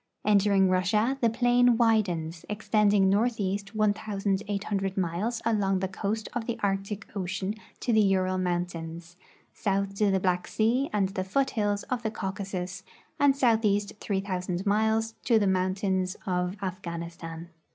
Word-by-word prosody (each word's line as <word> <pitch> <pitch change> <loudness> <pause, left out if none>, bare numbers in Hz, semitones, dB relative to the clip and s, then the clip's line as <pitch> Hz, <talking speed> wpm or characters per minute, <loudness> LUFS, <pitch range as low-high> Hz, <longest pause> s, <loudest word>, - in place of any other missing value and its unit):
Entering 200 -2 +4
Russia, 210 +8 +1
the 235 - +4
plain 245 0 +3
widens, 180 -8 +1
extending 210 -1 +3
north 220 +4 +2
east 200 +1 -2
1,800 200 -1 -1
miles 190 +6 -1
along 205 -4 +2
the 190 +1 -1
coast 205 +3 -3
of 235 -2 -3
the 235 -1 -3
Arctic 195 +1 -2
ocean 190 +1 -2 0.3
to 240 - 0
the 220 - +5
Ural 185 -2 +2
mountains, 175 -1 -3 0.4
south 195 0 -1
to 210 -1 +3
the 195 -1 +2
Black 180 -1 0
sea 240 +6 +1
and 200 -3 +1
the 190 -1 -3
foothills 205 -1 0
of 250 -2 -3
the 220 - -1
Cau 195 -3 -3
casus, 190 -1 -5 0.4
and 280 -1 +4
southeast 220 -5 +2
3,000 190 -2 -2
miles 220 +2 +1
to 235 -2 +4
the 210 - +2
mountains 185 0 0
of 180 +1 -1
Afghan 175 -3 -4
istan. 170 0 -8
200 Hz, 145 wpm, -28 LUFS, 185-220 Hz, 0.4 s, the